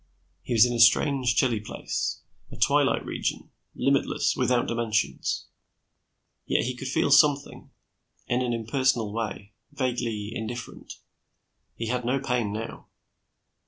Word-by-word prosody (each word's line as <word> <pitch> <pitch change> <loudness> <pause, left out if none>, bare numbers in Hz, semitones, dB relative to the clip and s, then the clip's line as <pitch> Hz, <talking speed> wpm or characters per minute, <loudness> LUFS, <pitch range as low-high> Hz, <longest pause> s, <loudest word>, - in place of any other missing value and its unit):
He 120 - -4
was 115 0 +7
in 120 - -1
a 120 - -2
strange, 125 +1 +4
chilly 120 -2 +2
place 105 - -4 0.3
a - - -9
twilight - - +2
region, - - -3 0.2
limitless, - - +1
without 125 -1 +1
dimensions. 110 - -1 1.0
Yet - - +2
he 130 - -2
could 130 +1 -6
feel 140 +2 +1
something, 145 0 +3 0.6
in 120 +1 0
an 125 -1 -1
impersonal 115 -1 0
way, 105 -2 -5 0.2
vaguely 120 -6 -2
indifferent. 120 +1 -6 0.8
He 115 - -4
had 125 +2 -1
no 130 +3 0
pain 125 -5 -1
now. 110 +2 -6
120 Hz, 125 wpm, -26 LUFS, 110-130 Hz, 1.0 s, was